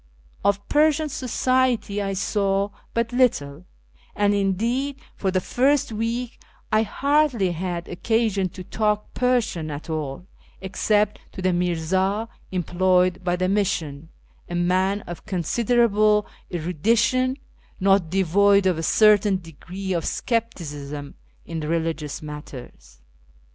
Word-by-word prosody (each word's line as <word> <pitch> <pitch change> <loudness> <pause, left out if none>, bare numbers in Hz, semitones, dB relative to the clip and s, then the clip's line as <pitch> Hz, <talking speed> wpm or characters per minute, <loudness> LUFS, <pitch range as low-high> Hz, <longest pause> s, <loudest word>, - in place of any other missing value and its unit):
Of 200 0 +1
Persian 305 +1 +3
society 255 -5 0
I 195 -1 -2
saw 195 0 0 0.2
but 230 +1 0
little, 170 - +1 0.5
and 205 0 +2
indeed 230 +8 0 0.2
for 195 - -1
the 185 0 +1
first 265 +7 +1
week 230 +3 -3 0.3
I 215 - +4
hardly 270 -4 +1
had 175 0 -4
occasion 205 0 0
to 185 +1 -9
talk 210 +2 -1
Persian 235 -11 0
at 150 +2 -6
all 155 +1 -4 0.3
except 205 +2 0
to 190 - -7
the 185 - +3
MiivA 180 +5 0 0.2
employed 180 0 +1
by 175 0 +1
the 185 +1 0
Mission 165 -7 -1 0.2
— - - -31
a 175 - -4
man 185 +3 +1
of 175 -3 -9
considerable 210 +2 +2 0.3
erudition, 225 - +1 0.4
not 195 -3 +3
devoid 195 +2 +3
of 180 -4 +2
a - - -1
certain 205 +2 +4
degree 185 +3 -6
of 170 -2 -1
scepticism 150 - -3 0.3
in 165 -1 -5
religious 160 -1 -2
matters. 130 - -10
195 Hz, 120 wpm, -23 LUFS, 175-225 Hz, 0.5 s, I